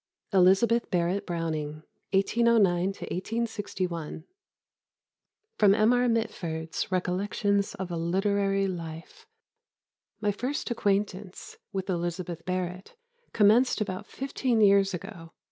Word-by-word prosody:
ELIZABETH 195 +6 +4
BARRETT 180 +2 0
BROWNING 155 -3 -3 0.3
1809 215 0 +4 0.7
1861 180 -8 -4 1.4
[Sidenote: 205 0 +5
M. 220 +3 +5
R. 245 0 +3
Mitford's 170 -9 -2
Recollections 200 +2 0
of 190 -2 -5
a 170 - -2
Literary 195 +3 +1
Life.] 165 -3 -7 0.9
"My 210 -1 +1
first 250 +6 -3
acquaintance 205 - -2
with 190 -2 -3
Elizabeth 175 -1 -3
Barrett 180 0 -4 0.4
commenced 225 +5 +4
about 185 -3 -3
fifteen 260 -3 -1
years 200 -2 +5
ago. 165 -2 -9
195 Hz, 95 wpm, -28 LUFS, 175-210 Hz, 1.4 s, Sidenote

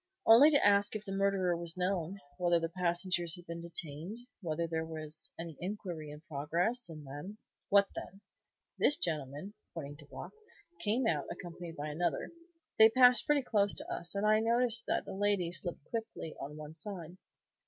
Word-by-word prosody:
"Only 235 +7 +9
to 285 -2 +4
ask 205 +1 +4
if 210 -1 -5
the 195 - -6
murderer 195 -2 +1
was 170 0 -3
known; 180 0 -1 0.2
whether 175 -1 +3
the 165 0 -2
passengers 175 0 0
had 175 -1 -12
been 170 0 -6
detained; 170 +3 -2 0.2
whether 170 -2 -1
there 160 -1 -2
was 155 -1 -5
any 165 -2 -6
inquiry 180 -5 -5
in 150 +1 -10
progress; 170 - -1
and 155 -2 -9
then 145 +10 -8 0.2
" - - -56
"What 200 0 +6
then?" 195 - -8 0.6
"This 295 - +4
gentleman," 150 - -2 0.2
pointing 145 -3 -6
to 145 -2 -14
Block, - - -8 0.5
"came 230 +4 +1
out, - - +1
accompanied 175 -2 -7
by 145 +1 -4
another. 160 0 -1 0.5
They 220 0 +10
passed 250 -1 +5
pretty 295 -2 +3
close 205 -4 +3
to - - -5
us, 175 +2 -3
and 200 +1 0
I 215 0 +5
noticed 235 +1 +3
that - - 0
the 195 - -6
lady 195 -3 +1
slipped 175 -3 -2
quickly 220 -8 -4
on 150 +2 -7
one 155 0 -8
side." 175 -1 -5
175 Hz, 180 wpm, -33 LUFS, 160-205 Hz, 0.6 s, They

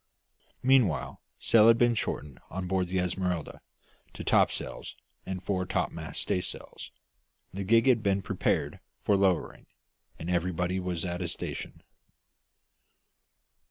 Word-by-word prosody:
Meanwhile 125 - +2 0.2
sail 110 -1 +5
had 115 0 +7
been 120 0 +4
shortened 75 - -3
on 95 +1 -4
board 90 0 0
the 95 +2 -2
Esmeralda 90 -2 -2 0.5
to - - -6
topsails - - +1 0.3
and 95 -1 -4
fore 95 -1 -1
topmast - - -2
staysail; 90 - -3 0.8
the 100 +1 -3
gig 115 +4 +4
had 125 -4 +4
been 100 -2 +1
prepared - - -1 0.2
for 105 - +3
lowering, 95 -3 0 0.5
and 80 - -7
everybody 90 +1 0
was 90 -1 -3
at 90 0 -3
his 85 - -2
station. - - -6
95 Hz, 125 wpm, -29 LUFS, 90-100 Hz, 0.8 s, had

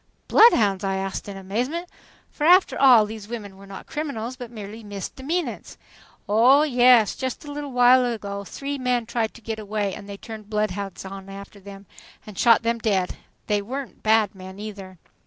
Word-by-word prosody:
"Bloodhounds!" 210 - +5
I 195 0 -1
asked 195 +1 -4
in 195 - -7
amazement, 245 - -3 0.4
for 295 - -6
after 360 +4 +5
all 250 -5 +6
these 215 -1 -8
women 210 -4 -7
were 195 +1 -14
not 195 -1 -10
criminals 255 -6 -4
but 245 -2 -9
merely 220 0 -9
misdemeanants. 265 - -5 0.5
"Oh, 245 +8 +5
yes. 245 -6 +5
Just 260 +3 -5
a 290 - -7
little 290 -1 -6
while 250 +1 +5
ago, 200 -4 -4
three 280 +7 -5
men 250 -2 0
tried 225 -1 -2
to 235 - -13
get 220 0 -5
away 210 -2 -2
and 200 - -10
they 200 - -7
turned 215 -1 -10
bloodhounds 205 -3 -3
after 195 +1 -10
them 200 0 -12 0.4
and 210 - -11
shot 230 +2 +4
them 230 0 0
dead 195 -5 0
and - - -13 0.3
they 205 -1 0
weren't 260 +5 -7
bad 220 -1 +3
men 190 0 -11
either." 200 -3 -9
220 Hz, 175 wpm, -23 LUFS, 200-250 Hz, 0.5 s, all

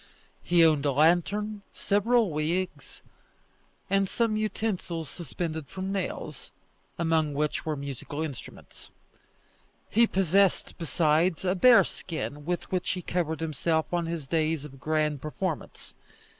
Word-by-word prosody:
He 170 -1 +4
owned 155 -3 +3
a 140 - +2
lantern, 195 +8 +2
several 215 0 +2
wigs, 170 +5 -3 0.8
and 195 -1 +2
some 230 -2 +1
utensils 195 -7 -2
suspended 160 -2 -5
from 190 +6 -5
nails, 175 -7 -4 0.5
among 160 -3 +1
which 150 +2 -1
were 155 - 0
musical 140 +2 -5
instruments. 140 -7 -9 1.0
He 230 +2 +5
possessed, 195 0 +2
besides, 165 +2 +1
a 180 - +2
bearskin 180 - +2
with 175 +1 -3
which 185 -1 -1
he 180 -1 -5
covered 160 -3 -2
himself 160 +1 -1
on 170 -1 0
his 165 -4 -4
days 155 -1 0
of 135 -2 -12
grand 150 0 0
performance. 155 +1 -5
165 Hz, 120 wpm, -28 LUFS, 155-190 Hz, 1.0 s, He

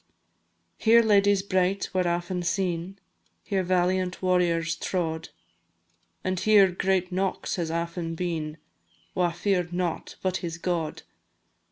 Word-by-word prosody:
Here 230 +1 +6
ladies 205 -2 +4
bright 190 0 0
were 185 -1 +1
aften 175 +1 -1
seen, 175 +1 -2 0.5
Here 195 -2 0
valiant 185 0 +1
warriors 175 -2 +1
trod; 160 -3 -2 0.9
And 185 -1 -1
here 205 -2 +5
great 185 0 0
Knox 190 +1 -1
has 170 -2 -2
aften 170 0 -3
been, 160 -3 -3 0.6
Wha 180 -1 +2
fear'd 180 0 0
nought 175 -2 -3
but 185 -1 +1
his 170 -2 -5
God! 170 -3 -2
180 Hz, 120 wpm, -26 LUFS, 170-190 Hz, 0.9 s, Here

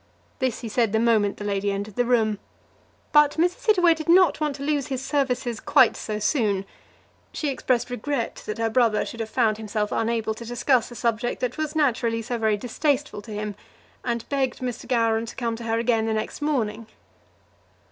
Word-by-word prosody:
This 260 -4 -1
he 235 - -5
said 225 -1 +1
the 220 - +3
moment 220 -3 +2
the - - -7
lady 200 0 0
entered 200 +1 -4
the 245 - +1
room. 220 -4 +2 0.7
But 295 -1 +5
Mrs. 355 +7 0
Hittaway 360 -6 +5
did 320 0 -6
not 345 -3 +5
want 300 -2 0
to 280 - -7
lose 290 -2 0
his 265 -1 -4
services 250 -5 -1
quite - - +4
so 215 -1 -4
soon. 210 -3 +1 0.7
She 300 - -2
expressed 250 -2 0
regret 245 +1 -3
that 215 - -3
her 225 0 0
brother 230 -3 +3
should 230 - -8
have 225 -1 -3
found 220 -3 +2
himself 210 -1 -2
unable 225 -1 0
to 225 - -9
discuss 240 +1 +1
a 240 - -10
subject 235 0 -1
that 250 +3 -2
was 310 0 -2
naturally 235 -6 +1
so 240 +1 -3
very 220 -2 +2
distasteful 270 +2 -1
to 220 - -11
him, 210 0 -4 0.5
and 235 -2 -2
begged 270 -2 -1
Mr. 250 -2 -5
Gowran 230 -2 +1
to - - -8
come 235 -2 -2
to 235 - -8
her 225 0 0
again 230 -1 +1
the 220 - 0
next 215 - -4
morning. 230 -7 -1
235 Hz, 195 wpm, -24 LUFS, 220-270 Hz, 0.7 s, But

